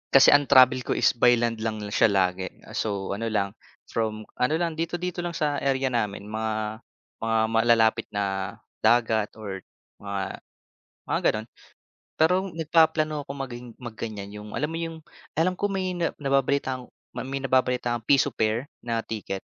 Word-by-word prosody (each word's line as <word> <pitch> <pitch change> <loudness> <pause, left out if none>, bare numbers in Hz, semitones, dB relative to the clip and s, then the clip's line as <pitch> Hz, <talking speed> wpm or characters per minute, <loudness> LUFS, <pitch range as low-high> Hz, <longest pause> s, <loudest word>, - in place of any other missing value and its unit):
Kasi 135 - +9
ang 145 -1 +5
travel 130 -1 +7
ko 125 - -2
is - - +4
by 120 0 +5
land 115 -1 -1
lang 110 0 -2 0.2
siya 115 - +5
lagi, 95 -2 +1 0.2
so 100 -3 -2
ano 115 +3 -2
lang, 100 -3 0 0.4
from 110 -1 -1 0.2
ano 125 +5 +2
lang 170 0 0
dito, 165 +1 -1
dito 180 0 -3
lang 175 -1 -3
sa 145 -2 0
area 135 -1 +1
namin 105 -4 -1
mga 110 0 -3 0.4
mga 115 0 0
malalapit 115 -1 +3
na 100 0 -2 0.2
dagat 110 -2 +2
or 100 -3 -6 0.4
mga 100 -1 -4 0.7
mga - - +2
gano'n. 110 +1 -5 0.7
Pero 160 +3 +5 0.2
nagpaplano 155 -2 +2
ako 140 - -5
maging 125 -3 -6 0.2
maggan'yan, 110 -3 -6
yung 105 0 -9
alam 150 +3 -1
mo 165 - -3
yung 165 -1 -4 0.4
alam 180 +4 +1
ko 205 - +1
may 185 -3 -2
na 170 - 0
nababalitaang 135 -2 0 0.3
ma - - -4
may 135 0 -3
nababalitaang 125 -3 +1
Piso 140 -2 +4
Pair 110 +5 -1
na 115 -1 -1
ticket. 100 -4 -5
120 Hz, 160 wpm, -26 LUFS, 110-145 Hz, 0.7 s, Kasi